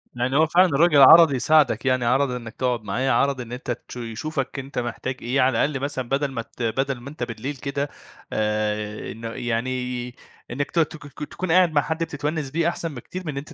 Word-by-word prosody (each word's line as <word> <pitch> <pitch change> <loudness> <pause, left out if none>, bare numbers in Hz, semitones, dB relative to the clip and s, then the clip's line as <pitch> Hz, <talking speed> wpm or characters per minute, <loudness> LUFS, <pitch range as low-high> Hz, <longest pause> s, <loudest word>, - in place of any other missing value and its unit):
يعني 125 +3 -1
هو 160 - +5
فعلًا 180 +4 +5
الراجل 150 -1 +4
عَرَض 165 +3 +9
يساعدك 135 -3 +3
يعني، 130 -2 +2
عَرَض 130 +2 +2
إنك 115 -3 -6
تقعد 125 -3 -1
معاه، 125 +7 -1
عَرَض 135 +2 +2
إن 120 0 -9
أنت 125 0 -4 0.2
تش - - -9
يشوفك 135 +4 -4
أنت 135 -1 -5
محتاج 125 +2 -4
إيه 125 +3 +1
على 130 - +5 0.2
الأقل 140 -2 -3
مثلًا 130 -4 -3
بدل 140 0 0
ما 115 - -3
ت 120 +1 -9
بدل 135 +3 -1
ما 140 - -8
أنت 145 -4 -6
بالليل 120 +5 -5
كده 140 +2 -3 0.4
آآ، 105 0 -2
إنه 115 +1 -7
يعني 125 +1 -3 0.4
إنك 140 +3 -3
ت 170 - +1
تك 145 -3 -2 0.2
تكون 180 -2 -3
قاعد 180 -2 +5
مع 145 - +4
حد 160 +1 -2
بتتونس 150 -2 -3
بيه 165 +1 +1
أحسن 165 -4 -4
بكتير 185 +9 -7
من 145 -3 -4
أنت 150 +4 -7
135 Hz, 205 wpm, -23 LUFS, 120-150 Hz, 0.4 s, عَرَض